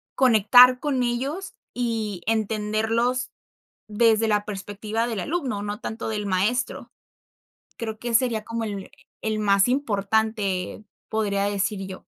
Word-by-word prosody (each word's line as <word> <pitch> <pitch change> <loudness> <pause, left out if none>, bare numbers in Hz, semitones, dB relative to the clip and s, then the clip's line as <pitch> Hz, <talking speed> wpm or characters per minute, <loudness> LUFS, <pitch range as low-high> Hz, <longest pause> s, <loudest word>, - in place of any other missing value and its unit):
conectar 250 +1 +6
con 280 -4 0
ellos 270 +10 -3 0.2
y 225 -6 -2
entenderlos 220 +3 0 0.6
desde 225 +1 +3
la 210 -1 +2
perspectiva 210 +3 -3
del 225 -5 -3
alumno, 265 - -2
no 205 0 -4
tanto 225 0 -4
del 210 -1 -3
maestro. 210 +7 -1 0.9
Creo 220 -2 -4
que 240 0 -4
sería 230 -3 +2
como 230 0 -3
el 200 -3 -5 0.3
el 215 -1 -1
más 200 -1 +4
importante, 215 -5 -1 0.2
podría 200 -2 0
decir 200 -1 -1
yo. 185 -1 -9
220 Hz, 125 wpm, -24 LUFS, 205-240 Hz, 0.9 s, conectar